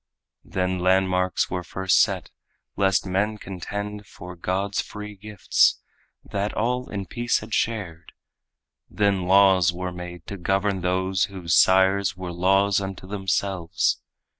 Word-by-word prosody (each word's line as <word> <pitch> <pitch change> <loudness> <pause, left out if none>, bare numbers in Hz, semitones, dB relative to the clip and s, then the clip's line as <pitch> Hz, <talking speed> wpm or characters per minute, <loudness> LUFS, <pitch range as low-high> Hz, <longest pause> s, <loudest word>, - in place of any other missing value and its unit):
Then 90 0 -2
landmarks 95 0 +1
were 90 -1 -2
first 95 +2 +2
set, - - 0 0.4
lest 95 0 +2
men 100 +3 0
contend 100 +2 -6
For 90 -2 -10
God's 95 +3 -1
free 105 0 -8
gifts, 105 0 +2 0.4
that 100 +1 -3
all 125 +3 -1
in 100 -2 -4
peace 120 +4 0
had - - -8
shared. 95 -10 -2 0.8
Then 100 -3 0
laws 95 -2 +5
were 90 +1 -4
made 90 -1 -8
to 100 - -6
govern 95 +1 0
those 95 +1 +1
whose 95 -5 -4
sires 95 +2 +4
Were 90 -1 -5
laws 95 +3 +2
unto 95 -1 -6
themselves. 95 -3 -1
95 Hz, 130 wpm, -24 LUFS, 90-100 Hz, 0.8 s, laws